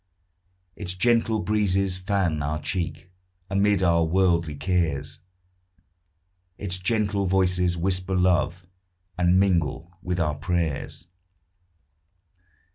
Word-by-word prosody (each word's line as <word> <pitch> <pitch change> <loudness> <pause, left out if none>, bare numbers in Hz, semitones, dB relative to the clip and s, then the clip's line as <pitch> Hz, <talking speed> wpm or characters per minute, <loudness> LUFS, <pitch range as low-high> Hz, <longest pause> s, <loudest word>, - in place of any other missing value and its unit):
Its 90 -3 -5
gentle 115 +2 +2
breezes 100 -3 +1
fan 90 -5 0
our 75 +2 -2
cheek; 90 +2 -4 0.4
Amid 100 -1 +2
our 85 -2 +3
worldly 85 -2 +1
cares 75 -2 -1 1.4
Its 95 -2 -3
gentle 100 0 0
voices 90 -2 +1
whisper 95 +1 -1
love, 90 -1 +1 0.5
And 90 +1 +3
mingle 85 -2 0
with 90 0 -2
our 75 -3 +1
prayers. 80 0 -3
90 Hz, 95 wpm, -25 LUFS, 85-95 Hz, 1.4 s, our